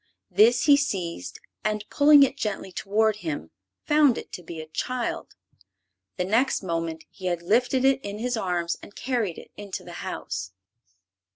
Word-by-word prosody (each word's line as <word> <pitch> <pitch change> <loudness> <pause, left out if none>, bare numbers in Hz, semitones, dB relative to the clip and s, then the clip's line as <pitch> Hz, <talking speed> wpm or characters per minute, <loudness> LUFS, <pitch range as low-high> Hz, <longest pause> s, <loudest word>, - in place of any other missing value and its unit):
This 225 +6 +5
he 285 -2 +7
seized 170 - -3 0.2
and, 215 0 -1
pulling 290 0 +7
it 270 0 +1
gently 210 -7 -3
toward 215 +3 +1
him, 155 - -5 0.3
found 295 -4 +4
it - - -8
to - - -7
be 170 -1 -8
a 155 - -6
child. 240 +10 -3 0.8
The 180 - 0
next 230 +4 +2
moment 165 -2 -3
he 185 - -6
had 175 -1 -1
lifted 245 +7 +2
it 270 0 +3
in 205 0 -5
his 245 +3 -1
arms 175 -5 -1
and 205 - -13
carried 235 -9 -1
it - - -12
into 205 -2 -6
the 175 - -10
house. 105 - -5
205 Hz, 165 wpm, -26 LUFS, 175-250 Hz, 0.8 s, he